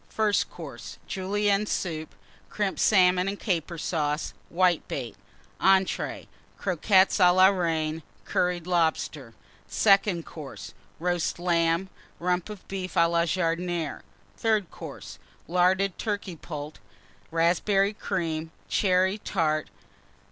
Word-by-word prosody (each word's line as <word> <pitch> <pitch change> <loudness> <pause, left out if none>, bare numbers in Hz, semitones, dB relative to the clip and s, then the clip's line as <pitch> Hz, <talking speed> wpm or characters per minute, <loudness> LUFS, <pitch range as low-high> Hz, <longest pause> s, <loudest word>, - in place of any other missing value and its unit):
FIRST 215 -2 +1
COURSE. 120 - -9
Julienne 200 +2 0
Soup. 160 -6 -3 0.3
Crimped 205 -2 -2
Salmon 185 -2 +4
and 200 +1 -3
Caper 170 -4 -2
Sauce. 155 -2 -1 0.2
Whitebait. 170 - 0 0.5
ENTREES. 190 0 +2 0.3
Croquettes 190 +2 +3
à 180 -1 +6
la 185 +1 +7
Reine. 165 -4 -1 0.2
Curried 180 -2 0
Lobster. 160 -7 0 0.3
SECOND 170 - +3
COURSE. 150 -4 -9 0.3
Roast 175 0 -1
Lamb. 170 +1 +1 0.3
Rump 180 +2 -1
of 210 -3 -10
Beef 185 -2 -5
à 170 - +5
la 170 0 +2
Jardinière. 170 -2 -1 0.4
THIRD 215 -6 +1
COURSE. - - -9 0.3
Larded 185 +2 +2
Turkey 205 -4 -3
Poult. 150 -1 -7 0.5
Raspberry 190 +5 +2
Cream. 165 -6 -3 0.2
Cherry 190 +1 +2
Tart. 155 -6 -1
180 Hz, 105 wpm, -27 LUFS, 165-190 Hz, 0.5 s, la